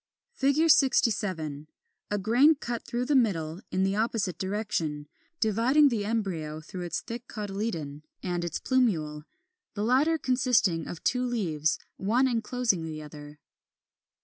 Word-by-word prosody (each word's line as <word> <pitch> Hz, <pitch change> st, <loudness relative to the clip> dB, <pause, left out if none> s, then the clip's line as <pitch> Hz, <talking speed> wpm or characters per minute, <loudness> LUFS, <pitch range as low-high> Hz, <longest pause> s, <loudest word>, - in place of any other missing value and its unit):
67. 225 Hz, -, +2 dB, 0.4 s
A 205 Hz, -, 0 dB
grain 245 Hz, -, +4 dB
cut 240 Hz, -4 st, -4 dB
through 240 Hz, +1 st, -2 dB
the 295 Hz, -, +1 dB
middle 175 Hz, -8 st, +1 dB
in 185 Hz, +1 st, 0 dB
the 195 Hz, +1 st, +1 dB
opposite 210 Hz, -6 st, -1 dB
direction, 190 Hz, -7 st, -2 dB, 0.3 s
dividing 240 Hz, +7 st, +4 dB
the 225 Hz, -5 st, -1 dB
embryo 180 Hz, -9 st, -2 dB
through 180 Hz, +4 st, -8 dB
its 175 Hz, -2 st, -3 dB
thick 235 Hz, +2 st, -7 dB
cotyledon 195 Hz, -8 st, -4 dB, 0.2 s
and 175 Hz, -2 st, -2 dB
its 170 Hz, -2 st, -2 dB
plumule, 160 Hz, -, 0 dB, 0.5 s
the 205 Hz, -, -2 dB
latter 275 Hz, +8 st, +3 dB
consisting 245 Hz, -, +1 dB
of 175 Hz, -, -8 dB
two 250 Hz, 0 st, +1 dB
leaves, 170 Hz, -12 st, 0 dB, 0.2 s
one 235 Hz, +7 st, +2 dB
enclosing 230 Hz, -5 st, 0 dB
the 160 Hz, -1 st, -5 dB
other. 150 Hz, 0 st, -10 dB
205 Hz, 130 wpm, -28 LUFS, 165-245 Hz, 0.5 s, grain